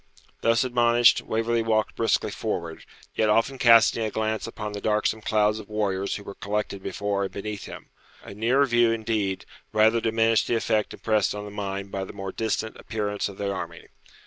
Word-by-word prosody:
Thus 115 +1 +3
admonished, 120 -1 +4
Waverley 115 +1 0
walked 110 -1 0
briskly 110 -2 +1
forward, 85 -7 -4 0.3
yet 110 -1 +1
often 115 +5 +2
casting 115 -2 +6
a 110 - -1
glance 110 +1 -2
upon 105 -2 -6
the 100 - -5
darksome 110 +1 0
clouds 105 0 +1
of 110 - -11
warriors 100 -2 -1
who 100 - -7
were 100 - -8
collected 100 -1 -3
before 100 0 -2
and - - -6
beneath 105 0 -6
him. - - -10 0.3
A - - -9
nearer 120 +7 +2
view, 120 -2 +3
indeed, 110 -4 -1 0.3
rather 110 +2 +4
diminished 115 0 +2
the 120 - +1
effect 110 -1 0
impressed 110 -3 0
on 105 0 -6
the 105 - -8
mind 100 -1 -5
by 95 - -3
the - - -8
more 95 -1 -5
distant 110 +1 -2
appearance 105 -2 -3
of 100 - -11
the 100 -1 -2
army. 95 - -7
110 Hz, 185 wpm, -25 LUFS, 100-115 Hz, 0.3 s, casting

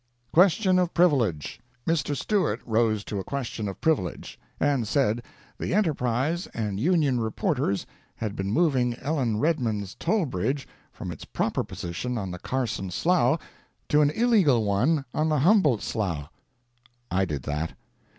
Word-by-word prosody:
QUESTION 185 +2 +5
OF 180 -1 0
PRIVILEGE 125 - +2 0.3
Mr. 150 -3 0
Stewart 185 - 0
rose 110 -2 +1
to 105 - -4
a - - -3
question 120 -5 -4
of 95 - -6
privilege, 150 - -1 0.2
and 140 -6 +1
said 120 -3 +1 0.4
the - - -1
ENTERPRISE 155 - 0
and 105 -3 -2
Union 150 -3 +2
reporters 125 - -1 0.3
had 105 -2 -4
been 95 0 -2
moving 130 -5 +2
Ellen 130 -5 -1
Redman's 110 - 0
toll 215 -5 0
bridge 130 +4 -2 0.2
from - - -6
its - - -8
proper - - -1
position 105 +9 -4
on 95 -4 -3
the 90 - -6
Carson 120 -6 -2
Slough 155 - +2 0.5
to 150 - +5
an 145 - +4
illegal 175 - +3
one 135 +9 +2
on 155 +1 +1
the 155 - +2
Humboldt 160 - +4
Slough. 85 -9 -2 0.8
[I 95 +2 +2
did 75 -8 -3
that. 75 +4 -3
125 Hz, 145 wpm, -26 LUFS, 105-160 Hz, 0.8 s, QUESTION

